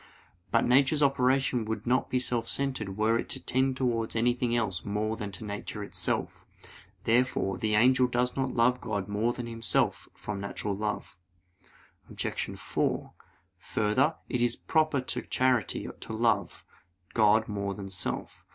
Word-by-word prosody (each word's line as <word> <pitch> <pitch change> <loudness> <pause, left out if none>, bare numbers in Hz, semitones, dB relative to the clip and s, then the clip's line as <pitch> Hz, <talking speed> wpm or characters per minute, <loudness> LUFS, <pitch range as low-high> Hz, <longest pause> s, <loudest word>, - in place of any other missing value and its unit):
But - - +3
nature's 135 +4 +4
operation 130 -2 +2
would 110 +1 -4
not 125 +2 +1
be 130 - +1
self 120 -2 -1
centered 120 -8 -2
were 110 +2 +3
it - - -4
to - - -2
tend 130 0 0
towards 115 -4 0
anything 120 +1 +1
else 100 -7 -1
more 105 +2 -1
than 105 -2 -5
to 110 - -5
nature 105 0 -5
itself. 100 - -3 0.6
Therefore 115 -5 +1
the 110 -1 +1
angel 125 +3 +5
does 125 0 0
not 135 -1 -1
love 125 +2 +3
God 100 -3 -3
more 105 +3 +1
than 120 0 -5
himself 115 -1 0
from 105 -1 -5
natural 100 0 -3
love. 105 -3 -4 0.9
Obj. - - -3
4: - - -1 0.4
Further, 110 - +1
it 125 - -1
is 120 -1 +2
proper 155 -3 +1
to 130 - -3
charity 130 -5 +1
to - - -7
love 115 +1 0 0.5
God 110 0 +4
more 100 -2 -3
than 95 -2 -7
self. 90 - -4
115 Hz, 150 wpm, -29 LUFS, 105-125 Hz, 0.9 s, angel